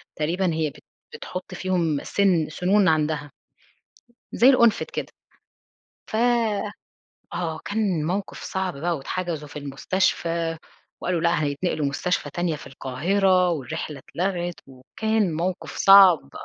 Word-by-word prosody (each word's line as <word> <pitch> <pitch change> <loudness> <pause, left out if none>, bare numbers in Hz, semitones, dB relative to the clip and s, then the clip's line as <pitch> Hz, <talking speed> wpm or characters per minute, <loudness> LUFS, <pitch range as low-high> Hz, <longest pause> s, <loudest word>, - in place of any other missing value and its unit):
تقريبًا 170 +3 0
هي 160 -2 0
بت - - -17 0.3
بتحط 185 - -7
فيهم 175 -5 -1
سن 180 -6 +2
سنون 185 +4 +2
عندها. 150 -2 0 1.0
زي 245 - +6
القنفد 235 -4 +4
كده. - - -4 1.0
ف - - -4 1.2
آه 165 -3 -3
كان 200 -7 0
موقف 190 +3 -3
صعب 190 -5 -3
بقى 170 +3 -1
واتحجزوا 160 0 -4
في 150 - -8
المستشفى، 165 +3 -1 0.4
وقالوا: 175 -2 -1
"لأ 170 -2 +2
هيتنقلوا 145 +1 -1
مستشفى 145 +1 -1
تانية 175 -1 -1
في - - -12
القاهرة" 180 +8 +1
والرحلة 150 -1 -4
اتلغت 175 +3 -3
وكان 190 +9 -1
موقف 175 +3 -3
صعب. 185 -8 +7
170 Hz, 115 wpm, -24 LUFS, 150-185 Hz, 1.2 s, صعب